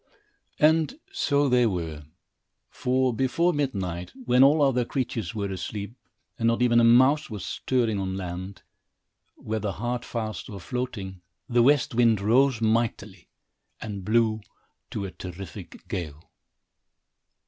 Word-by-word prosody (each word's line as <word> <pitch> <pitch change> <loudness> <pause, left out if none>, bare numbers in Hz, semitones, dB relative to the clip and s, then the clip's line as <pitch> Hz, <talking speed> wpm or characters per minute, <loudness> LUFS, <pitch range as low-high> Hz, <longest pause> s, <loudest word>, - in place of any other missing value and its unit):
And 160 - +3 0.2
so 145 - +1
they 125 -2 +4
were; 80 -6 -4 0.7
for, 130 0 +1
before 165 +8 +1
midnight, 95 - -3
when 125 +2 +5
all 145 +2 +5
other 130 -3 +3
creatures 115 - -3
were 100 -2 -2
asleep, 100 +3 -5 0.5
and 115 - +2
not 115 +1 +2
even 120 -1 +4
a - - +4
mouse 130 +6 +5
was 105 -5 -6
stirring 115 -5 0
on 95 0 -3
land, 95 +1 -6 0.7
whether 110 -2 -3
hard 120 +5 -3
fast, 110 -3 -5
or 100 - -7
floating, 100 -3 -5 0.3
the 120 -2 +3
west 140 +1 +3
wind 115 -3 +4
rose 120 +4 +3
mightily 110 -4 -1 0.5
and 100 -3 -6
blew 110 +1 +2 0.5
to 100 - -4
a 95 - -6
terrific 90 -2 -9
gale. 80 -4 -6
115 Hz, 130 wpm, -26 LUFS, 95-125 Hz, 0.7 s, when